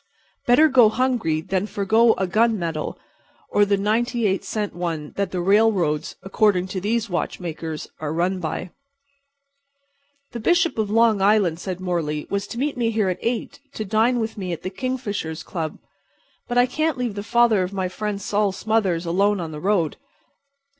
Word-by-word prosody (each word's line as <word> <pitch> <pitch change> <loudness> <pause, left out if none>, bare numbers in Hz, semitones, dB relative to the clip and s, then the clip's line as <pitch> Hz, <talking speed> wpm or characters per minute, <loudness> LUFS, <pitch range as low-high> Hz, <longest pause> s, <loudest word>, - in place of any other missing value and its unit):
Better 250 +6 +6
go 250 -6 +6
hungry 225 -10 0
than 190 +3 -1
forego 220 +3 +3
a 190 - -1
gunmetal 185 -6 0 0.5
or 205 - +4
the 200 0 +2
ninety 230 +4 0
eight 190 -1 +1
cent 210 -2 -3
one 165 -4 -4
that 200 0 -1
the 185 - -3
railroads—according 190 0 +2
to 185 0 -4
these 225 +3 0
watchmakers—are 160 -4 -4
run 180 +3 0
by. 170 +1 -4 1.6
"The 235 - -5
Bishop 340 - +2
of 215 -2 0
Long 225 -2 +3
Island," 195 -5 +3
said 185 -1 -5
Morley, 165 -5 -2
"was 200 0 -1
to 235 - -7
meet 280 +2 -1
me 235 -2 +1
here 215 -4 +1
at 180 - -3
8 235 0 -3
to 215 - -4
dine 225 +5 +2
with 220 -2 -3
me 185 -2 -3
at 170 - -5
the 185 - -4
Kingfishers' 205 -9 -4
Club. 160 -4 -4 0.7
But 245 - -2
I 245 - +6
can't 310 +3 -1
leave 245 -4 -2
the 200 - -5
father 230 -1 +3
of 180 0 -2
my 190 -2 -2
friend 205 +2 -4
Sol 205 0 0
Smothers 190 -4 0
alone 200 +4 +2
on 165 -2 -4
the 150 - -7
street. 180 -3 0
200 Hz, 165 wpm, -23 LUFS, 180-225 Hz, 1.6 s, Better